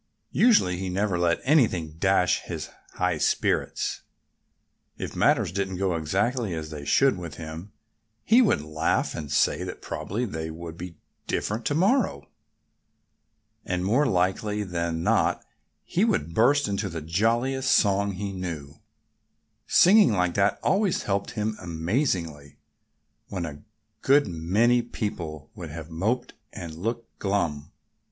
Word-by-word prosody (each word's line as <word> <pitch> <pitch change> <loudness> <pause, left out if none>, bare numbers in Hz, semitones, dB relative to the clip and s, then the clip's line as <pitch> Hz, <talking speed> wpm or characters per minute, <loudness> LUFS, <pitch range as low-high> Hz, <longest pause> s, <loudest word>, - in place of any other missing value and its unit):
Usually 205 - +4
he 95 0 -3
never 95 -1 0
let 85 -1 +1
anything 95 - +2
dash 95 -2 +3
his - - -6 0.2
high - - 0
spirits. - - 0 1.0
If - - -6
matters - - +3
didn't 95 -1 -2
go 95 -2 0
exactly 100 - -1
as 80 -1 -6
they 75 -2 -7
should 100 - +3
with 85 -4 -7
him 80 +5 -8 0.5
he 235 +4 +5
would 205 - +2
laugh 75 0 0
and 75 -2 -6
say 75 - +2
that - - -6
probably 115 +6 -3
they 80 -6 -5
would 80 0 -8
be 85 -1 -8 0.3
different 110 +2 -2
to 145 - 0
morrow. 205 - +2 1.4
And 90 0 -2
more 130 +9 +3
likely 105 +1 0
than 85 -3 -2
not - - +1 0.4
he - - 0
would 75 +3 0
burst 140 +8 +3
into 100 0 -2
the 85 -3 -6
jolliest 115 - +1
song 100 -1 +3
he 100 +1 -4
knew. 80 -7 -6 0.9
Singing 185 - +6
like 90 -2 +1
that 100 +1 +2
always 195 -2 +1
helped 100 0 -1
him 105 +1 -1
amazingly, 85 - -2 0.7
when 90 -3 -4
a 75 -2 -8 0.4
good 140 +2 +4
many 100 +8 +2
people 85 -10 -5
would 85 -3 -8
have 80 +1 -8
moped 110 +10 -1 0.2
and 85 -6 -7
looked 115 +7 -5
glum. 85 -8 -1
95 Hz, 135 wpm, -26 LUFS, 80-115 Hz, 1.4 s, Singing